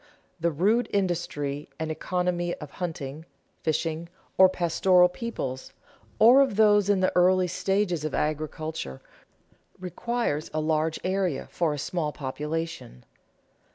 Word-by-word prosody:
The 170 +1 +1
rude 205 +10 +1
industry 150 -7 -2
and 160 0 -2
economy 175 +1 -1
of 150 -2 -10
hunting, 160 -4 -5 0.4
fishing, 160 +1 -2 0.3
or 190 0 +7
pastoral 180 +1 +3
peoples, 175 - -5 0.4
or 245 +5 +7
of 265 -7 +1
those 205 -2 +4
in 200 -2 +3
the 185 - +2
earlier 185 +1 +4
stages 190 -3 0
of 155 - -2
agriculture, 155 - -3 0.8
requires 185 -3 -2
a - - +1
large 155 +1 0
area 185 -6 -1
for 170 -3 0
a 150 - -3
small 155 +1 -2
population. 150 - -5
170 Hz, 120 wpm, -26 LUFS, 155-185 Hz, 0.8 s, or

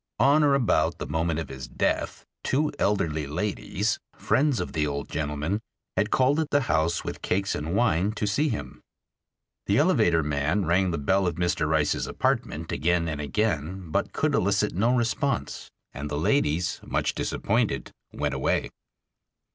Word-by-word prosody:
On 140 +6 +5
or 140 -1 +4
about 130 -5 +2
the - - -5
moment 80 +1 -1
of 75 -5 -5
his 65 -2 -7
death, - - -1 0.2
two 150 +3 +1
elderly 80 -7 0
ladies, 105 +5 -1 0.2
friends 140 -3 +1
of - - -4
the 75 -2 +1
old 70 -1 -3
gentleman, 75 +7 -2 0.3
had 105 +2 +1
called 135 +6 +3
at 155 -2 -1
the 145 - +3
house 85 -7 +1
with - - -6
cakes 95 +1 0
and 80 +5 -3
wine, 100 -4 +2
to 105 - -2
see 140 +10 +1
him. 110 - -5 0.9
The - - +3
elevator 80 -2 +3
man 75 +6 0
rang 90 +3 +2
the 85 - -1
bell 95 +6 +2
of 85 - -1
Mr. 85 -3 0
Rice's 80 -2 +1
apartment 80 +2 -1
again 85 +1 +1
and 75 -2 -3
again, 85 0 -2
but - - 0
could - - 0
elicit - - +2
no 110 +8 +2
response, 120 - -1 0.2
and 70 +3 -5
the 75 - -2
ladies, 85 - +1
much - - -1
disappointed, 105 - -1 0.2
went - - -2
away. - - 0
85 Hz, 165 wpm, -26 LUFS, 75-110 Hz, 0.9 s, On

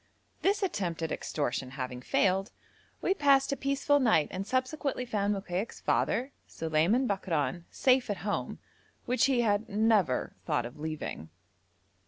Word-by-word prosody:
This 400 +1 +2
attempt 180 - -2
at 160 - -2
extortion 130 -3 -2
having 125 -1 -4
failed, 190 +8 +1 0.5
we - - +3
passed 280 -6 +4
a - - +1
peaceful 275 +2 +1
night 220 - +3
and 190 +2 -4
subsequently 260 0 -1
found 205 -4 0
Mokaik's 195 +1 -3
father, 260 +3 0 0.2
Suleiman 165 +11 +1
Bakran, 175 -4 -1
safe 255 -3 +2
at 205 - -1
home, 205 - -2 0.5
which 250 +1 +3
he 260 -3 +3
had 210 -1 +1
never 210 - +2
thought 120 - 0
of 120 +5 -9
leaving. 155 - -5
205 Hz, 140 wpm, -30 LUFS, 165-260 Hz, 0.5 s, passed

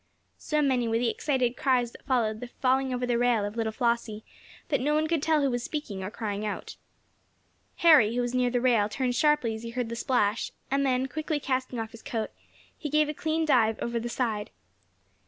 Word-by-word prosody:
So 300 -1 0
many 255 -4 +2
were 225 0 +1
the 235 -1 +1
excited 255 -4 0
cries 250 -3 +1
that - - -16
followed 225 -5 +1
the 245 - -6
falling 260 +2 0
over 250 0 -1
the 240 -1 +1
rail 240 -4 +2
of 205 +1 -5
little 225 -1 -1
Flossie, 235 -2 -1 0.5
that 280 - +1
no 295 +3 +1
one 310 +1 +2
could 320 -2 0
tell 310 -1 +2
who 275 - +2
was 245 0 -1
speaking, 235 -9 -5
or 190 - -3
crying 210 -1 -4
out. 210 -1 -5 1.0
Harry, 285 -10 +6
who 245 - +1
was 245 0 -3
near 250 -1 +2
the 245 0 0
rail, 230 -5 +3
turned 250 +3 -1
sharply 295 -4 +2
as 220 - -6
he 230 - -6
heard 240 0 -3
the 235 - -4
splash, 230 -4 0 0.2
and 280 +1 +2
then, 260 -1 +1
quickly 310 +2 -2
casting 260 -3 -2
off 225 -1 -4
his 230 - -12
coat, 225 -2 -3 0.4
he 300 - -5
gave 305 +1 +3
a - - -2
clean 315 +2 -1
dive 225 -7 +3
over 235 0 -2
the 240 +1 -4
side. 225 -4 -2
245 Hz, 215 wpm, -28 LUFS, 225-275 Hz, 1.0 s, Harry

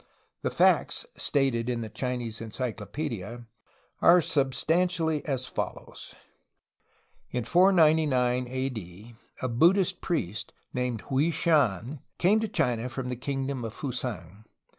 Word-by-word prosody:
The - - 0
facts - - +3
stated 130 -5 0
in 120 -1 -1
the 110 - -4
Chinese 120 0 -4
encyclo 115 -1 -4
pedia 120 -5 -5 0.6
are 175 +1 +7
substantially 160 +3 +1
as 130 -3 0
follows: 125 - -6 1.1
In 125 - -2
499 155 - +4
A. 130 +2 -2
D. 110 0 -9 0.3
a - - +1
Buddhist 175 +9 +3
priest, 110 - -3 0.2
named 125 -3 -2
Hwui 145 +5 +2
Shan, 140 - +1 0.2
came 200 +5 +4
to 220 - -1
China 125 - 0
from 130 0 -4
the 125 - -2
kingdom 135 0 -3
of 115 -1 -6
Fusang. 110 - -5
125 Hz, 120 wpm, -28 LUFS, 115-155 Hz, 1.1 s, are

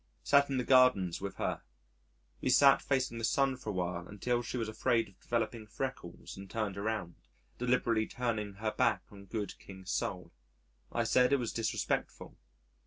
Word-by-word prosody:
Sat 140 0 +4
in 135 - 0
the 125 - +1
gardens 125 -10 +4
with 100 0 -4
her. - - -2 0.8
We - - 0
sat 135 +2 +6
facing 130 -4 0
the - - -6
sun 135 +3 +2
for 125 -4 -7
a - - -2
while 90 -1 -2
until 120 +4 -1
she 125 - -4
was 115 -2 -1
afraid 115 +1 +1
of 100 -1 -21
developing 115 -1 -2
freckles 120 -7 -6
and 95 0 -10
turned 110 -4 -2
around, 100 -4 -3 0.4
deliberately 120 -3 +1
turning 110 -5 -2
her 110 +2 -2
back 105 - +1
on 100 -1 -12
good 105 0 -4
King 95 -1 -12
Sol.... - - -3 0.6
I - - 0
said 125 0 +4
it 140 - +5
was 120 -4 -3
disrespectful. 115 - -2
115 Hz, 175 wpm, -32 LUFS, 100-125 Hz, 0.8 s, sat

